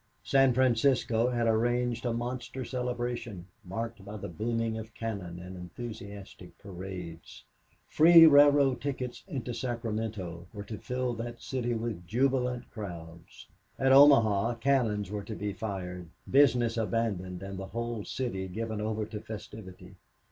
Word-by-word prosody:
San 135 -1 +4
Francisco 120 -1 +2
had 120 -2 0
arranged 120 +1 +1
a - - 0
monster 120 +2 -4
celebration 120 -6 -3 0.2
marked 115 +3 -5
by 105 +2 -7
the - - -6
booming 115 +5 -2
of 110 0 -8
cannon 100 -7 -5
and 90 +1 -9
enthusiastic 100 +2 -9
parades. 90 -4 -8 0.4
Free 165 +1 +8
railroad 145 -3 +6
tickets 130 -3 -4
into 130 -8 -4
Sacramento 110 -7 -4
were 100 -1 -6
to 105 0 -7
fill 125 -1 -2
that 120 0 -6
city 120 -2 -2
with 110 -6 -4
jubilant 125 +2 0
crowds. 85 -6 -9 0.3
At 135 0 +3
Omaha 120 -6 +6
cannons 115 -6 +1
were 105 -1 -3
to 110 - -6
be 105 -1 -3
fired, 90 -4 -5 0.2
business 125 -4 +4
abandoned, 100 -5 -2
and 95 -1 -6
the 95 - -6
whole 115 -1 -4
city 100 -8 -3
given 110 +3 -4
over 110 0 -2
to 105 -1 -7
festivity. 95 -4 -10
115 Hz, 135 wpm, -30 LUFS, 100-125 Hz, 0.4 s, Free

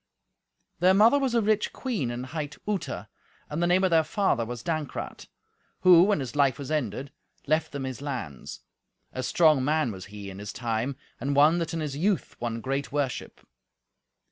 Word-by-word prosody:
Their 185 +2 +5
mother 225 +8 +6
was 265 -3 0
a 230 - +3
rich 215 0 +1
queen 220 - -2
and 120 +1 -4
hight 150 +1 -5
Uta, 205 -3 -3 0.4
and 150 +3 -2
the 175 - +3
name 180 +2 +3
of 185 - +3
their 165 -1 +5
father 190 - +1
was 120 -1 -6
Dankrat, 155 -5 -4 0.5
who, 180 -2 +8
when 205 -5 +2
his 130 -1 -6
life 140 -4 +3
was 140 +1 -6
ended, 140 -2 -2 0.3
left 155 +2 +1
them 140 -1 -4
his 130 0 -5
lands. 125 - -6 0.5
A 130 - -3
strong 155 +1 +4
man 150 -3 +1
was 95 -2 -8
he 100 -1 -8
in 95 - -9
his 105 0 -6
time, 120 +3 -2 0.2
and 140 +3 -1
one 155 +4 +5
that 165 -1 -3
in 165 - -2
his 145 -3 -3
youth 190 +6 0
won 115 -1 -3
great 135 +3 -2
worship. 140 -3 -3
145 Hz, 185 wpm, -27 LUFS, 125-170 Hz, 0.5 s, who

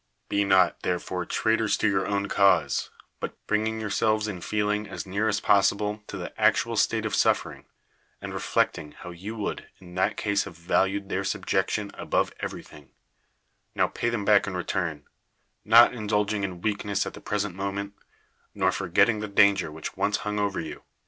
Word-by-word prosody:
Be 100 - +2
not 95 -3 +3
therefore 90 0 -2
traitors 110 -1 +1
to - - +1
your 95 -2 +1
o^\'n 100 0 -1
cause; 100 0 +3 0.3
but - - -5
bringing 110 +1 0
yourselves 110 0 0
in 95 -4 -5
feeling 105 +1 -1
as - - -6
near 100 +4 -1
as 105 -1 +1
possible 105 +1 +2
to - - -6
the - - -6
actual - - +3
state - - +1
of - - -2
suffering, - - +1 0.5
and - - -7
re - - -3
flecting 75 -1 -1
how 90 - -9
you 95 +6 -7
would 105 - -4
in 90 -1 -14
that 95 +1 0
case 100 -1 0
have 85 - -10
valued 95 +3 0
their 100 - -1
subjection 95 +2 -1
above - - -1
everything, 75 -2 -8 0.9
now - - +3
pay 120 - -2
them 115 -4 -2
back 105 -1 +5
in 95 -2 -3
return, 85 -4 -3 0.6
not 115 +2 +7
indulging 105 -2 -1
in 90 -3 -4
weakness 100 -1 -1
at - - -6
the - - -11
present 105 -2 -2
moment, 100 +1 -4 0.6
nor 95 -2 +2
forgetting 100 +5 +2
the 105 - -4
danger 100 -5 +3
which 80 +1 -7
once 105 +1 +1
hung 105 0 -1
over 100 -1 -1
you. 80 - -6
100 Hz, 175 wpm, -26 LUFS, 95-105 Hz, 0.9 s, not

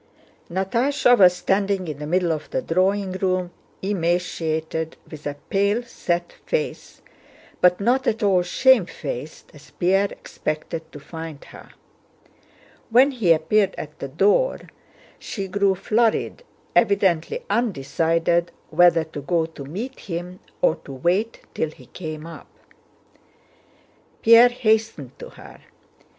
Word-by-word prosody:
Natásha 245 +8 +2
was 180 -5 +6
standing 195 0 0
in 150 -2 -5
the 150 - -5
middle 175 +1 +1
of 155 -2 -4
the 130 - -2
drawing 190 +3 +1
room, 185 -1 -1 0.3
emaciated, 165 -4 -1
with 150 -2 -7
a 145 - -4 0.2
pale 200 +4 +2
set 175 -7 -3
face, 485 -1 -4 0.6
but 180 0 +5
not 245 +6 +1
at 220 0 0
all 190 -3 +4
shamefaced 175 - 0
as 150 -1 -16
Pierre 195 +3 +1
expected 160 +1 -5
to 145 - -10
find 160 0 -9
her. - - -14 1.2
When 255 +5 +5
he 225 -10 +1
appeared 190 +5 +2
at 150 0 -8
the - - -4
door 200 - +2 0.6
she 195 -3 -5
grew 200 0 +1
flurried, 225 - 0 0.3
evidently 195 -7 +2
undecided 170 - 0 0.2
whether 175 -2 +5
to 155 -2 -8
go 165 +3 0
to 160 -4 -10
meet 220 - -6
him 180 0 -6 0.2
or 160 - +3
to 145 -3 -11
wait 180 - 0
till 160 - -1
he 135 -4 -16
came 155 +1 -7
up. 165 -1 -11 1.7
Pierre 230 +2 +8
hastened 220 - -1
to - - -9
her. - - -14
180 Hz, 125 wpm, -23 LUFS, 160-205 Hz, 1.7 s, Pierre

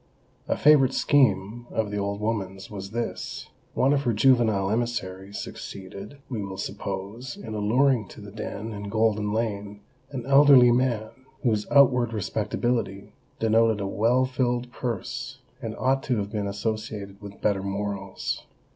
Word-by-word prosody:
A - - 0
favourite 145 -3 +5
scheme 120 -4 +2
of 110 -2 -1
the 105 - -2
old 100 0 -2
woman's 95 -3 -3
was 100 -2 -6
this:—One 120 +3 -2
of 140 - +2
her 120 -4 +1
juvenile 110 -4 +3
emissaries 100 -4 -3
succeeded, 100 +6 -8
we 115 -5 -3
will 100 -1 -6
suppose, 100 +5 -5
in 110 - -7
alluring 115 +2 +2
to - - -12
the 100 -1 -10
den 105 +1 -5
in 100 0 -6
Golden 110 -1 +1
Lane 105 -2 -3 0.3
an 130 -4 -5
elderly 135 -3 +7
man 120 -3 +1 0.3
whose 110 -4 +1
outward 125 -4 +5
respectability 105 0 -2 0.2
denoted 115 -1 +3
a 100 - -2
well 115 +6 +2
filled 125 -1 -1
purse, 120 -5 -4 0.2
and - - -4
ought 135 +1 +2
to 125 -3 0
have 100 0 -3
been 105 -2 -2
associated 105 -1 -4
with 100 -1 -10
better 100 -2 +1
morals. 100 0 -4
110 Hz, 145 wpm, -26 LUFS, 100-120 Hz, 0.3 s, elderly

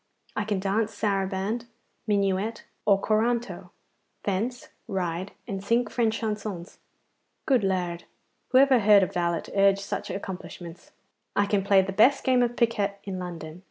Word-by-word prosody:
I 210 - -1
can 205 -2 -1
dance 210 +3 0
saraband, 200 +3 -1 0.4
minuet, 200 +2 0 0.2
or 200 -2 +5
corranto; 230 +3 0 0.5
fence, 220 +6 -2 0.2
ride, 185 -2 -3
and 195 -1 -4
sing 235 +4 +2
French 225 0 0
chansons. 210 -5 -5 0.7
Good 255 -6 +3
Lard! 180 -3 -1 0.4
who 255 - +3
ever 265 -2 +6
heard 205 -2 +6
a - - +4
valet 170 -3 -1
urge 195 0 +5
such 200 - -4
accomplishments? 180 -3 -7 0.4
I 205 - +3
can 200 -1 +1
play 195 -1 +5
the 195 - -4
best 235 +8 +4
game 255 -2 +3
of 240 0 +1
piquet 205 -5 +1
in 190 -2 -5
London. 170 -2 -7
200 Hz, 145 wpm, -26 LUFS, 190-225 Hz, 0.7 s, ever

